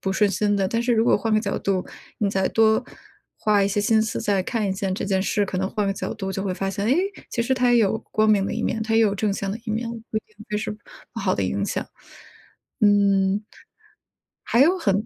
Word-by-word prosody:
不 190 - -2
顺 205 0 +2
心 205 +1 +1
的。 195 - +1
但 230 +4 -1
是 240 0 +2
如 225 0 +3
果 - - +4
换 225 - -2
个 215 - +5
角 215 - -2
度， 190 -2 -1 0.3
你 200 -2 +1
再 190 -1 +1
多 220 -1 +3 0.5
花 210 -2 +2
一 195 - +2
些 205 +1 0
心 220 +1 +3
思 220 0 -2
再 200 -2 +1
看 220 +2 -2
一 195 - 0
下 190 0 -3
这 190 - -3
件 190 -1 +1
事， 205 +1 +1
可 185 -1 -4
能 190 0 -1
换 210 -2 -1
个 195 - +1
角 195 - -4
度 195 -3 -4
就 190 - -3
会 190 -2 -2
发 195 +1 -2
现， 200 +1 -3
诶， 260 +7 +3 0.3
其 235 - -1
实 250 +3 0
它 250 -1 +2
也 - - +5
有 220 0 +2
光 215 0 +2
明 200 -2 +3
的 - - -3
一 - - -2
面， 220 - -1
它 225 0 -1
也 225 - +5
有 210 -3 +3
正 205 +1 0
向 195 0 -3
的 225 - -5
一 - - -2
面， 225 +2 -2 0.2
不 - - -3
一 - - +1
定 215 - -30
就 210 - -1
是 210 - -3
不 215 +2 -11
好 190 -2 +1
的 - - -1
影 100 +1 -1
响。 - - -3 0.9
嗯 200 -1 +3 1.0
还 235 - +1
有 350 +7 +5
很 205 - 0
205 Hz, 280 characters per minute, -23 LUFS, 195-220 Hz, 1.0 s, 个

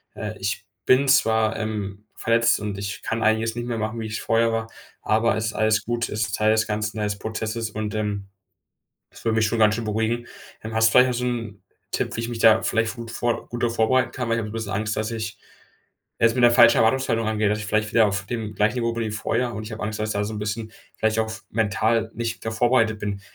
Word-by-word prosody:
äh, - - -5
ich - - -3 0.2
bin 130 +2 +4
zwar, 110 -5 +3
ähm, 105 -2 -4
verletzt 115 0 +2
und 105 -2 -4
ich 100 0 -5
kann 115 0 -2
einiges 110 +1 +1
nicht 120 0 -4
mehr 120 -1 -2
machen, 110 +1 -3
wie 110 - -4
es 110 - -4
vorher 115 0 +2
war, 115 0 -1 0.3
aber 110 +1 +2
es 110 0 -1
ist 110 - -3
alles 110 0 +2
gut, 120 0 -1
es 110 - -3
ist 100 -2 -1
Teil 110 0 +3
des 110 0 +2
Ganzen, 105 0 -2
Teil 105 -1 0
des 100 -1 -4
Prozesses“, 110 +1 -3
und, 105 0 -4
ähm, 105 -2 -3 0.8
das - - -15
würde 110 -1 +1
mich 110 - +3
schon 115 +1 -1
ganz 110 -1 +5
schön 115 - -4
beruhigen. 110 +2 -1 0.4
Ähm, 110 +1 -6
hast 110 0 +5
du - - -3
vielleicht 125 0 +6
noch 125 - -1
so 125 - -2
'n 115 -5 -4 0.3
Tipp, - - -2
wie - - -2
ich 115 - -3
mich 120 -1 -5
da 115 -1 +6
vielleicht 115 0 0
gut 115 -1 -7
vor 120 +1 -2
gut 120 0 -5
da 120 - +2
vorbereiten 120 +3 +2
kann? 125 -2 -3
Weil 115 - +1
ich - - 0
habe 105 -1 -5
'n - - -8
bisschen 110 -2 -4
Angst, 105 +1 -1
dass 110 +1 -2
ich 110 -3 -5 0.8
es 115 0 +4
mit 125 - +1
'ner 120 - +7
falschen 120 -1 +7
Erwartungshaltung 115 -1 +2
angeht, 110 -1 +1
dass 105 - 0
ich 105 - -5
vielleicht 105 0 0
wieder 115 -1 +5
auf 100 0 -2
dem 110 -3 -4
gleichen 105 +4 +1
Niveau 115 -1 0
bin 115 0 -2
wie 110 - -3
vorher 120 +3 -1
und 110 - -5
ich 110 - -8
habe 110 - -7
Angst, 110 0 -3
dass 110 - -1
ich - - -1
da 100 0 0
so 110 - -4
'n 105 - -4
bisschen 110 +1 -4 0.3
vielleicht 110 0 +1
auch 110 - +1
f 110 -2 -8
mental 110 +1 +1
nicht 115 -1 -4
da 110 - -1
vorbereitet 115 -1 +2
bin. 100 -1 -4
110 Hz, 260 wpm, -24 LUFS, 110-115 Hz, 0.8 s, ner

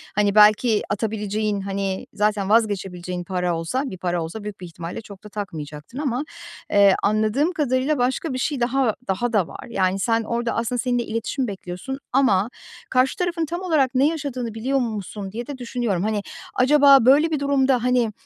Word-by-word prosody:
hani, 205 0 +2
belki 215 +1 +5
atabileceğin, 210 -1 -1
hani, 195 -1 -3
zaten 210 -1 0
vazgeçebileceğin 190 -5 0
para 180 -1 -1
olsa 210 +12 -2
bir 190 -9 -6
para 175 -1 -1
olsa 185 +7 -7
büyük 210 -1 -7
bir - - -6
ihtimalle 170 +3 -7
çok 200 -3 -13
da 210 - -10
takmayacaktın 155 - -7
ama, 275 -2 -1 0.5
eee, 200 -1 +6
anladığım 215 - +2
kadarıyla 280 -1 +1
başka 260 +4 0
bir - - -2
şey 275 +2 -1
daha 245 -1 +1
daha 235 +5 -1
da 195 -6 +2
var. - - -9
Yani, 190 -3 0
sen 225 +3 +1
orada 235 +1 -2
aslında 235 +2 -1
seninle 245 -1 0
iletişim 230 +4 -2
bekliyorsun 195 +6 -6
ama 230 -6 +3 0.4
karşı 255 +1 +2
tarafın 350 -2 -1
tam 345 +4 -4
olarak 295 -8 +1
ne 270 +3 +4
yaşadığını 275 -7 -3
biliyor 260 +5 0
musun 210 -4 -4
diye 235 +3 -6
de 285 - -6
düşünüyorum. 235 -7 -2
Hani, 215 -1 0 0.3
acaba 275 -1 +6
böyle 295 +5 +5
bir 305 - 0
durumda, 270 -3 +2
hani, 250 -3 +2
225 Hz, 175 wpm, -23 LUFS, 200-260 Hz, 0.5 s, eee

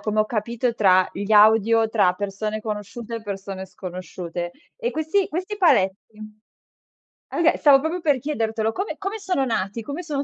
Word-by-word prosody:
come 215 0 0
ho - - +3
capito, 235 +2 -2
tra 185 -4 +4
gli 200 +2 -5
audio 220 +1 +5
tra 210 -5 +3
persone 205 +2 -3
conosciute 215 +2 -5
e 225 - -8
persone 195 -2 -6
sconosciute. 180 -2 -6 0.2
E 485 -1 -2
questi 315 +5 0
questi 370 +6 -4
paletti 210 - +2 1.2
oka 335 -1 +3
s - - -8
stavo 280 -2 +6
proprio 325 +5 -3
per 290 -5 +2
chiedertelo, 225 -5 -1
come 390 +3 -3
come 405 +2 -4
sono 365 -9 -1
nati? 225 -1 -2
Come 290 +9 -6
son 285 -3 -2
225 Hz, 165 wpm, -23 LUFS, 200-295 Hz, 1.2 s, stavo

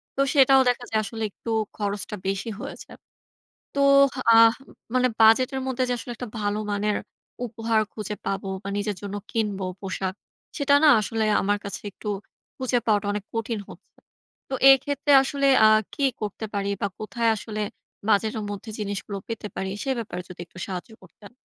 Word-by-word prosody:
তো 275 - +1
সেটাও 270 -1 +6
দেখা 245 0 -1
যায় 220 - +1
আসলে 220 +2 -5
একটু 230 - -7 0.3
খরচটা 205 0 -3
বেশি 195 +4 -2
হয়ে - - -6
যায়। - - -14 0.8
তো 280 - 0 0.6
আহ 230 0 +8
উম - - -16 0.2
মানে 255 0 +4
বাজেট 225 +4 +6
এর 265 - -1
মধ্যে 260 -1 0
যে - - +1
আসলে 240 - -6
একটা 245 0 -6
ভালো 205 0 0
মানের 205 +1 0 0.5
উপহার 225 0 0
খুঁজে 210 -1 -5
পাবো 195 0 -2
বা 200 - -6
নিজের 205 -1 -2
জন্য 200 0 -5 0.2
কিনবো 205 -4 -1
পোশাক। 190 -1 -3 0.4
সেটা 285 -2 +3
না - - +8
আসলে 220 +2 -1 0.2
আমার 205 +1 +1
কাছে 200 - -5
একটু 210 - -8 0.5
খুঁজে 255 -1 +1
পাওয়াটা 205 -2 +2
অনেক 205 -1 -4
কঠিন 225 -1 -2
হচ্ছে। 185 - -15 0.5
তো - - -3 0.2
এক্ষেত্রে 285 +2 +1
আসলে 275 +1 0 0.2
আ - - +8 0.3
কি 280 - -1 0.2
করতে 210 +1 -4
পারি 200 0 -1
বা 200 - +2
কোথায় 230 +1 0
আসলে 215 0 -4 0.5
বাজেটের 215 +1 +2
মধ্যে 205 +2 -6
জিনিসগুলো 200 -1 -4
পেতে 225 -2 -5
পারি? 190 0 -2
সে 270 - -1
ব্যাপারে 205 -6 -5
যদি 180 -1 -10
একটু 185 - -15
সাহায্য 185 +3 -6
করতেন। 195 +3 -15
215 Hz, 175 wpm, -25 LUFS, 200-240 Hz, 0.8 s, আহ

